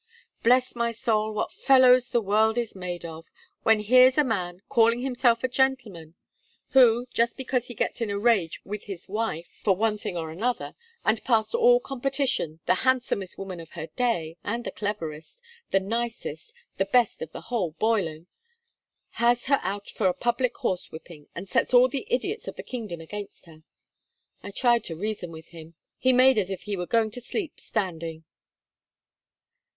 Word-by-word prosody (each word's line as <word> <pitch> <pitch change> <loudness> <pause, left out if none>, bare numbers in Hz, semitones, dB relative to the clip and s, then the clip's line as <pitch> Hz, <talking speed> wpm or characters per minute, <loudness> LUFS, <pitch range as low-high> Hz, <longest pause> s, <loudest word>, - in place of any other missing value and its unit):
Bless 250 +2 +3
my 235 0 0
soul, 220 -2 0
what 215 - -2
fellows 255 -2 +5
the 240 -2 +1
world 220 +3 +2
is 235 -2 -1
made 180 -2 -6
of, 165 0 -9 0.3
when 225 -1 +4
here's 255 +5 +6
a 300 - +5
man, 185 -7 -3
calling 230 +1 +3
himself 245 -2 +2
a - - +3
gentleman, 240 -11 -1 0.5
who, 245 -2 +5
just 235 0 +1
because 255 -2 -1
he 240 - -8
gets 235 - -2
in 225 - -1
a 200 - -1
rage 200 -7 +2
with 210 +1 -6
his 190 -4 -7
wife 205 -5 -2 0.2
for 195 -3 +3
one 210 +1 0
thing 175 - -4
or 160 -1 -4
another 235 +9 -2 0.3
and 220 0 +1
past 225 - +1
all 485 +1 +5
competition 270 - -1
the 185 - +4
handsomest 250 -7 0
woman 190 -3 -6
of 165 -1 -11
her 160 -2 -5
day, 175 -10 -1
and 235 +3 -3
the - - -4
cleverest, 170 - -5 0.3
the 195 - +3
nicest, 230 - -4 0.3
the 195 - +1
best 235 +2 +2
of 160 - -6
the - - -8
whole 220 -9 -2
boiling 175 -6 0 1.0
has 240 0 +3
her 275 0 +3
out 200 +2 -4
for 200 - 0
a 180 - +1
public 240 +1 0
horsewhipping, 165 -3 -5
and 185 +3 -6
sets 220 - +1
all 245 +1 +7
the 260 0 -4
idiots 380 - -2
of - - -5
the - - -8
kingdom 215 -9 -6
against 205 +5 -8
her! 160 -2 -16 0.8
I - - -8
tried 240 +3 +2
to 165 - -4
reason 195 -1 -4
with 160 0 -11
him. 165 -1 -12 0.2
He 260 - +4
made 255 -1 +5
as 190 -2 -1
if 190 -2 -5
he 205 -1 -3
were 180 -2 -4
going 225 -2 +2
to 245 - -7
sleep 325 - -5
standing.' 165 -4 -4
220 Hz, 175 wpm, -26 LUFS, 180-245 Hz, 1.0 s, all